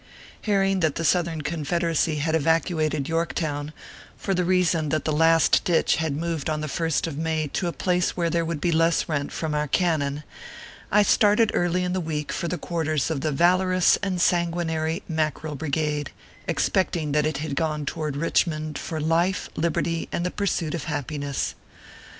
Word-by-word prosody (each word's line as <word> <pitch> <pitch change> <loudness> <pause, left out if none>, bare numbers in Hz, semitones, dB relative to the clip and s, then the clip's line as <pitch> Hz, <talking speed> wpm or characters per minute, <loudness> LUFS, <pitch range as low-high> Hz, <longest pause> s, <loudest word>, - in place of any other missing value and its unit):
Hearing 195 -2 +2
that 160 -5 +1
the 165 - -2
Southern 165 +1 +1
Confederacy 165 +1 0
had 155 +2 -1
evacu 160 +1 +2
ated 150 -3 -1
Yorktown, 155 -3 -2 0.5
for 195 - -2
the 180 -1 +1
reason 175 -4 +2
that 155 +1 -1
the 155 - +1
Last 165 +1 +4
Ditch 170 -2 +2
had 160 -3 -1
moved 165 -2 -2
on 155 -1 -1
the 155 - -3
first 160 +1 0
of 155 -3 -5
May 160 -1 0
to 175 - -2
a - - -1
place 180 +1 0
where 170 -1 0
there 170 -1 +1
would 165 -2 -3
be 170 - +1
less 165 +1 +2
rent 145 -3 -2
from 160 -2 -3
our 150 0 0
cannon, 150 -3 0 0.7
I 210 0 +5
started 210 +2 +4
early 175 +1 +1
in 180 0 -1
the 185 - -1
week 150 -2 -3
for 170 - -2
the 180 - -2
quarters 160 -5 -1
of 145 -4 -2
the 155 - 0
valorous 185 +4 +3
and 190 -3 -1
san 170 0 +3
guinary 160 +1 -2
Mackerel 155 -1 -2
Brigade, 150 0 -2 0.4
expecting 170 -5 0
that 150 +1 +2
it 155 -2 -2
had 150 -1 -3
gone 150 -1 -1
toward 150 0 -3
Kichmond 155 0 0
for 160 - -4
life, 170 +4 +1
liberty, 165 0 -1
and 175 - -2
the 180 - -1
pursuit 180 -6 -1
of 170 - -4
happiness. 145 -2 -3
160 Hz, 180 wpm, -24 LUFS, 150-175 Hz, 0.7 s, I